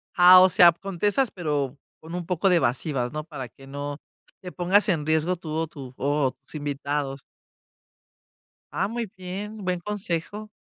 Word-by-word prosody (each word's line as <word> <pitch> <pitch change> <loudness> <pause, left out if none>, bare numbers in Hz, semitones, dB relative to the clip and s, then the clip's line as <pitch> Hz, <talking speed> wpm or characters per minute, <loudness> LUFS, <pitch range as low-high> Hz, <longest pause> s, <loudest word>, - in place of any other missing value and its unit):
Ah, 180 +1 +9
o 185 - +6
sea, 175 0 +7
contestas, 200 +7 -1
pero 145 -6 -2 0.2
con 160 +2 -11
un 175 -2 -4
poco 180 +2 +1
de 180 - +5
evasivas, 130 -1 -1
¿no? 155 0 -4
Para 135 -6 -8
que 135 +5 -17
no 145 +1 -5 0.4
te 180 -1 -8
pongas 185 +4 +2
en 155 -4 0
riesgo 160 +3 +1
tú 165 -2 -9
o 160 +1 -1
tu 135 -5 -10
o 140 -1 +1
tus - - -14
invitados. 145 -2 -3 1.5
Ah, 195 - +1
muy 230 +1 -3
bien, 195 +4 -6
buen 180 -1 -1
consejo. 205 +1 -4
165 Hz, 165 wpm, -25 LUFS, 145-185 Hz, 1.5 s, Ah